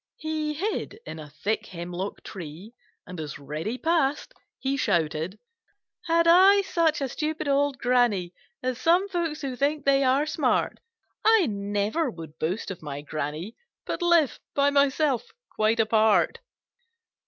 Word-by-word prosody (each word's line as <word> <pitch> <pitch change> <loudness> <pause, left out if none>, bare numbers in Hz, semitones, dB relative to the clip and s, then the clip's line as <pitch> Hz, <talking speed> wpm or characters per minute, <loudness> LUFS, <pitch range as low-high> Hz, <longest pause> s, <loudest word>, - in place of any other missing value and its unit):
He 310 -1 -2
hid 410 +4 -3
in 160 - -7
a 150 -1 -9
thick 200 +9 -2
hemlock 180 +2 -6
tree 180 +4 -9 0.3
and 180 -2 -8
as 150 -2 -5
Reddy 155 - -4
passed 310 -2 0 0.2
he 270 +1 -1
shouted: 165 - 0 0.7
"Had 335 0 +3
I 385 +4 +7
such 330 -5 +1
a 275 - 0
stupid 305 +3 -3
old 280 -1 +2
Granny 240 -9 +2 0.3
As 255 -1 -2
some 355 +4 +4
folks 335 -5 -2
who 270 -3 -3
think 290 +3 0
they 275 0 +4
are 265 +3 +3
smart, 305 -4 0 0.4
I 440 -4 +5
never 205 +7 -1
would 160 -5 -10
boast 180 +6 -2
of 185 - -8
my 145 -2 -6
Granny, 155 +7 -4 0.3
But - - -4
live 340 -5 +3 0.2
by 285 0 +3
myself 280 -3 +1 0.2
quite 220 +2 +2
apart!" 215 -5 +3
255 Hz, 140 wpm, -26 LUFS, -, 0.7 s, I